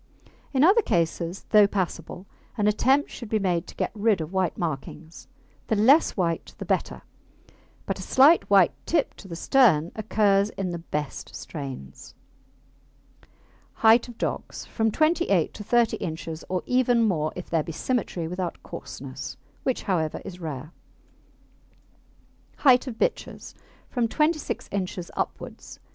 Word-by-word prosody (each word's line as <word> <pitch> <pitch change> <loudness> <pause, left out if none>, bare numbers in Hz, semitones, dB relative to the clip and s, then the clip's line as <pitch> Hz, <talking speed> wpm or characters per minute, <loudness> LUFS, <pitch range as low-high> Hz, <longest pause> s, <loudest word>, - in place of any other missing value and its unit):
In 270 0 +3
other 395 +8 +6
cases, 170 - -1
though 210 -2 +7
passable, 180 -2 -4 0.3
an 210 - +1
attempt 260 +7 +2
should 235 - -8
be 220 - +2
made 180 -5 0
to - - -11
get - - -2
rid 215 -2 +2
of 160 +3 -5
white 185 -3 0
markings. 160 0 -5 0.4
The 220 - +1
less 255 +9 +4
white 170 -3 -1
the - - -6
better, - - -1 0.8
but - - -3
a - - -5
slight 285 +6 +5
white 195 -4 +6 0.2
tip 315 -4 +1
to 195 - -12
the 170 - -6
stern 175 - +3
occurs 205 -2 +2
in 185 -2 -2
the 170 - -4
best 150 -3 -5
strains. 135 - -8 1.7
HEIGHT 225 +2 +6
OF 240 -2 -11
DOGS - - -4
From 225 -1 0
28 315 +7 +1
inches 160 - -2
to 210 - -8
30 240 +2 +2
inches, 160 0 -5
or 185 -1 -1
even 245 -2 +3
more 155 -8 +1
if 180 - -8
there 165 -2 +2
be 165 - -6
symmetry 180 -3 -2
without 180 0 -4
coarseness, - - -8 0.2
which, 260 - -1
however, 165 -6 -1
is 180 -1 -8
rare. 150 -1 -6 1.9
HEIGHT 260 -2 +5
OF 235 -3 -6
BITCHES - - -2 0.3
From 240 -3 0
26 305 +5 -1
inches 185 -3 -4
upwards. - - -5
195 Hz, 145 wpm, -25 LUFS, 170-240 Hz, 1.9 s, though